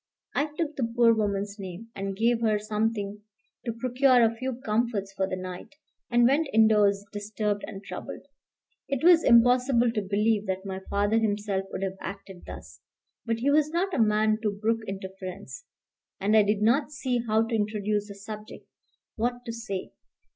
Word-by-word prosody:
I 290 - +1
took 310 -3 -2
the 230 -4 -1
poor 235 -1 +6
woman's 205 -1 -2
name, 190 +4 -8
and 195 0 -4
gave 230 +1 +2
her 215 -2 +2
something 210 -1 -2 0.4
to 235 - -1
procure 250 +1 +3
a 225 0 +3
few 255 +2 -4
comforts 215 -3 -1
for 190 -1 -1
the - - -2
night, 185 +8 -8 0.3
and 240 0 +4
went 285 +5 +3
indoors 210 -2 +4
disturbed 205 0 -2
and 195 +1 -8
troubled. - - -8 0.6
It 275 -1 -2
was 345 -1 +7
impossible 245 0 +5
to 220 -2 -1
believe 210 +1 +1
that 190 +1 -3
my 190 -1 -4
father 205 +2 +2
himself 205 -3 -1
would - - -4
have 190 0 -3
acted 195 -2 -8
thus; - - -10 0.5
but 230 0 -1
he 280 +3 +2
was 300 0 +3
not 355 +4 -1
a - - 0
man 215 0 +3
to 215 - +1
brook 220 +3 -1
interference, 190 - -7 0.5
and 205 +3 +2
I 215 - +8
did 205 0 +1
not 270 +7 +3
see 260 -4 -1
how 220 +1 +3
to 230 - -5
introduce 210 -1 -1
the 200 - -9
subject, 210 +1 -9 0.5
what 245 +2 -2
to 230 - -4
say. 220 -5 -5
215 Hz, 175 wpm, -27 LUFS, 200-235 Hz, 0.6 s, I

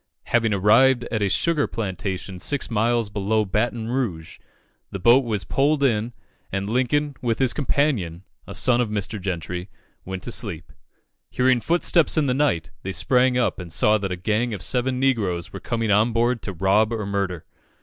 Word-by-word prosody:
Having 115 -2 +1
arrived 120 +6 +4
at 110 -2 -1
a 100 - +1
sugar 155 - +1
plantation 95 -3 -4
six 140 +6 0
miles 115 -1 +1
below 105 +2 0
Baton 110 +3 -1
Rouge, 95 -11 -3 0.5
the - - -5
boat 120 +8 +5
was 110 -5 -2
pulled 140 +1 +1
in, 115 -2 +1 0.4
and 95 0 -2
Lincoln, 130 +6 0
with 115 -2 0
his 130 -2 +1
companion, 125 - -1 0.2
a - - -8
son 125 -1 +3
of 120 - -1
Mr. 105 0 -4
Gentry, 90 0 -4 0.3
went 95 0 -6
to 120 - -3
sleep. 90 -9 -3 0.6
Hearing 130 -1 +2
footsteps 170 +1 +2
in 155 - +3
the 130 - +1
night, 130 - 0
they 95 - -5
sprang 125 - +2
up, 125 - 0
and 90 -2 -8
saw 105 +6 +3
that 95 -2 -3
a - - -1
gang 110 +5 -1
of 90 - -8
seven 125 +3 -1
negroes 105 -11 0
were 95 - -6
coming 115 -1 -2
on 110 +3 +3
board 120 +1 +1
to 100 - -5
rob 100 +5 +2
or 110 -3 -3
murder. 100 -4 -3
110 Hz, 180 wpm, -23 LUFS, 95-125 Hz, 0.6 s, boat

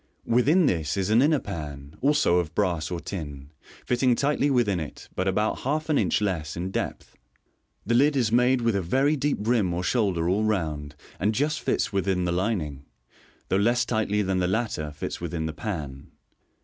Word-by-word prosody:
Within 145 +10 +4
this 80 - 0
is 95 +1 0
an 115 +3 +5
inner 150 +2 +4
pan, 75 - -7
also 140 -11 +3
of 80 -2 -4
brass 90 -6 0
or 90 -2 -3
tin, 75 -5 -7 0.3
fitting 125 0 +2
tightly 145 +2 +1
within 115 -9 +2
it, 75 -2 -8
but 95 - -1
about 105 +3 0
half 155 +4 -2
an 150 - +3
inch 95 0 +1
less 85 -7 -2
in 90 +2 -3
depth. - - -4 0.7
The 115 - 0
lid 140 +5 +4
is 120 -5 +1
made 125 +2 +3
with 115 -3 +1
a 100 - +1
very 135 - +2
deep 145 0 0
rim 105 -6 +1
or 90 - -2
shoulder 95 -6 +1
all 100 +4 +1
round, 80 -8 -2 0.2
and 105 +3 +1
just 150 +4 0
fits - - -1
within 95 -2 0
the 85 - 0
lining, 85 -7 -2 0.7
though 95 - +2
less 120 +4 +2
tightly 105 -3 0
than 95 -1 0
the 90 - +1
latter 95 -7 -1
fits 75 - -6
within 85 -2 -3
the 80 - -3
pan. 75 -7 -5
100 Hz, 190 wpm, -26 LUFS, 85-120 Hz, 0.7 s, an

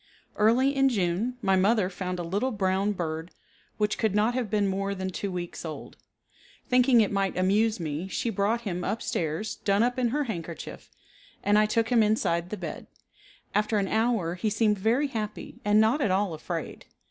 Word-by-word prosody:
Early 250 +6 +3
in 270 0 +4
June 210 +3 -1
my 195 -1 +3
mother 200 +1 +3
found 185 -1 -4
a 175 - -3
little 200 +9 -1
brown 195 -2 0
bird 160 -2 -4 0.5
which 210 0 0
could 215 -3 +1
not 215 +3 +3
have 245 -4 -2
been 205 -1 +1
more 195 +1 -1
than 190 0 -3
two 195 +2 -4
weeks 175 -1 -5
old. 160 -2 -7 0.7
Thinking 250 -1 +5
it 210 - +1
might 195 -2 0
amuse 210 +4 +2
me 160 +2 -3
she 210 +5 -2
brought 215 +3 0
him 180 -5 -3
up 225 - -2
stairs 165 +6 -2
done 200 +2 +2
up 245 +2 0
in 245 - +2
her 290 +5 0
handkerchief, 170 - -7 0.5
and 205 - +3
I 215 0 +5
took 225 +1 +1
him 240 -2 +4
inside 180 -5 +1
the 215 - -4
bed. - - -6 0.7
After 210 +1 +1
an 195 -1 +1
hour 220 -6 +1
he 185 +5 -1
seemed 210 -1 +1
very 240 +8 +2
happy 215 -4 -5
and 210 +1 +4
not 225 +7 +3
at 240 - +2
all 190 -1 +1
afraid. 165 +1 -6
205 Hz, 190 wpm, -27 LUFS, 185-225 Hz, 0.7 s, Thinking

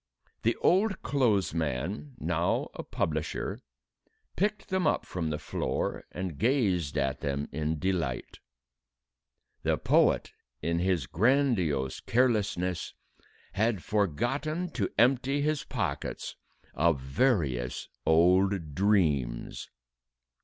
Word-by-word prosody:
The 115 +1 +2
old 195 +2 +3
clothes 115 -9 +2
man, 85 - -3
now 85 -3 0
a - - -5
publisher, 80 0 -2 0.8
picked 205 +1 -1
them 190 -4 +1
up - - +1
from 85 -3 -3
the 75 - -1
floor 75 - -2
and 90 -5 -5
gazed 100 - +1
at 70 -2 0
them 70 0 -2
in 80 +2 -1
delight. 85 -7 -2 1.2
The - - +1
poet, - - +3 0.3
in 85 0 0
his 90 -1 +1
grandiose 95 - +1
carelessness, 105 -8 0 0.6
had 105 -1 +1
forgotten 125 - 0
to 105 -9 -1
empty 135 +4 +3
his 155 0 0
pockets - - -3 0.4
of 80 0 +2
various 65 - 0 0.2
old 90 0 +3
dreams! 75 - +1
95 Hz, 105 wpm, -29 LUFS, 80-125 Hz, 1.2 s, old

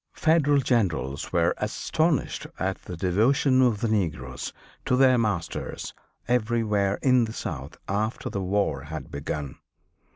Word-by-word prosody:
Federal 145 -3 +3
generals 85 - 0
were - - +3
astonished 160 -2 0
at - - -2
the 90 - -6
devotion 130 - +3
of 120 -5 +2
the 115 - +1
negroes 80 - -2 0.3
to 125 - +2
their 130 0 +5
masters 95 -7 -2 0.3
everywhere 110 -4 +1
in 125 -3 +5
the 110 - -7
South - - -6
after 105 +3 -1
the 100 - -3
war 95 -7 0
had 75 -3 -7
begun. 70 0 -5
105 Hz, 130 wpm, -26 LUFS, 85-125 Hz, 0.3 s, their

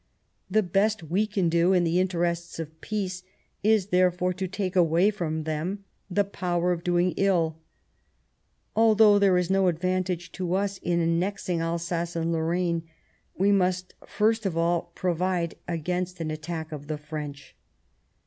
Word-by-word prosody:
The 215 +3 +3
best 200 +3 +1
we 185 +7 0
can 200 -4 0
do 170 +3 +3
in 180 -2 +3
the 170 +1 +2
interests 170 -2 -1
of 160 -1 -7
peace 190 -4 -3 0.4
is, 210 -2 +3
therefore, 180 0 +2
to 190 +1 -3
take 185 0 -3
away 175 +3 +4
from 160 -6 -3
them 165 +6 -3 0.3
the 200 +2 +2
power 180 -3 -1
of 170 -1 -2
doing 175 0 +2
ill..., 170 -5 +1 1.2
Although 215 -2 +6
there 195 -2 +4
is 180 0 0
no 195 -1 +3
advantage 180 +1 -1
to 180 -1 -2
us 195 0 -1
in 175 -1 0
annexing 170 +1 0
Alsace 170 +1 -2
and 165 0 0
Lorraine, 170 +1 0 0.6
we 195 +2 +3
must 185 -2 +1
first 220 0 +1
of 170 -3 -3
all 170 0 0
provide 180 -1 0
against 180 +2 -2
an 160 -1 -2
attack 160 +1 -5
of 145 -2 -7
the 155 -1 -3
French." 150 -2 -7
180 Hz, 150 wpm, -26 LUFS, 165-190 Hz, 1.2 s, Although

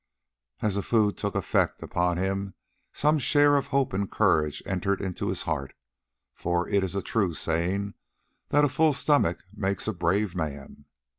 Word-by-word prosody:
As 105 -2 +1
the 100 - -1
food 105 +1 +2
took 100 -1 -3
effect - - 0
upon 90 0 0
him 95 +1 -2 0.4
some 150 +1 +2
share 145 +2 +4
of 140 - +1
hope 140 -5 0
and 100 +1 -1
courage 75 -2 +1
entered 95 +1 -1
into 95 -3 -3
his - - -2
heart, 70 -3 -3 0.6
for 85 0 -1
it 100 -2 +2
is 95 0 -3
a 100 - -1
true 100 -7 0
saying 90 +6 -1 0.6
that 145 0 +4
a - - +3
full 155 +2 +3
stomach 140 - +2
makes 100 -1 -2
a 110 - 0
brave 95 +2 0
man. 70 -3 -5
100 Hz, 165 wpm, -27 LUFS, 85-115 Hz, 0.6 s, share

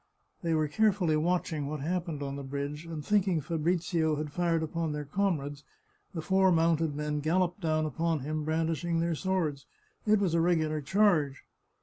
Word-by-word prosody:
They 165 -3 0
were 155 -1 +2
carefully 190 -2 +2
watching 160 -2 0
what 150 -1 -4
happened 165 -2 -2
on 140 0 -4
the 140 - -5
bridge, 140 +3 -5
and 155 -3 -6
thinking 195 -5 +2
Fabrizio 165 0 0
had 150 0 -4
fired 165 0 +1
upon 160 0 -2
their 150 0 -4
comrades, 145 -4 -1 0.5
the 160 - -3
four 190 +1 +4
mounted 165 -2 +2
men 150 0 -2
galloped 175 +5 0
down 155 -2 +1
upon 160 +1 -1
him, 155 +3 -3
brandishing 165 +1 0
their 170 0 +1
swords; 160 -5 -1 0.4
it 215 0 +5
was 195 -5 0
a 170 - +3
regular 155 -3 +1
charge. 155 -5 +2
160 Hz, 165 wpm, -30 LUFS, 150-175 Hz, 0.5 s, it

